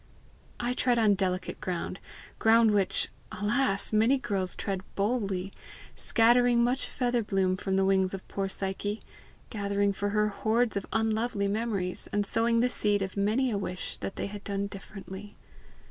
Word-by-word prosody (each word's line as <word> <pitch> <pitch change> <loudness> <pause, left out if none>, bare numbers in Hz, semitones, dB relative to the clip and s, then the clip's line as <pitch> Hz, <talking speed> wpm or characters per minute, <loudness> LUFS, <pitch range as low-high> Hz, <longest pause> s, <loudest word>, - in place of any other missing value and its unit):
I 245 +1 0
tread 250 -1 +1
on 215 -3 +4
delicate 185 -1 -2
ground 180 +1 -3 0.4
ground 225 0 +5
which, 200 -2 +2 0.2
alas! 210 +1 +1
many 225 +6 +4
girls 195 -7 -1
tread 195 -2 -3
boldly, 195 -3 -1 0.4
scattering 240 +1 +4
much 250 +3 0
feather 245 -1 0
bloom 195 -3 +1
from 190 +1 -2
the 195 0 +3
wings 190 -1 +2
of 190 - -10
poor 195 -1 -2
Psyche, 200 +2 -2 0.5
gathering 200 -1 0
for 205 +1 -2
her 210 +1 +2
hoards 220 +3 +1
of 200 - -3
unlovely 220 -1 0
memories, 200 -3 -2
and 205 0 +1
sowing 230 +3 +2
the 245 - +4
seed 205 -4 +1
of 190 - -5
many 220 +6 +1
a 205 - -1
wish 180 -2 -5
that - - -5
they - - -3
had 205 0 -7
done 200 0 -2
differently. 195 0 -9
205 Hz, 160 wpm, -29 LUFS, 195-230 Hz, 0.5 s, ground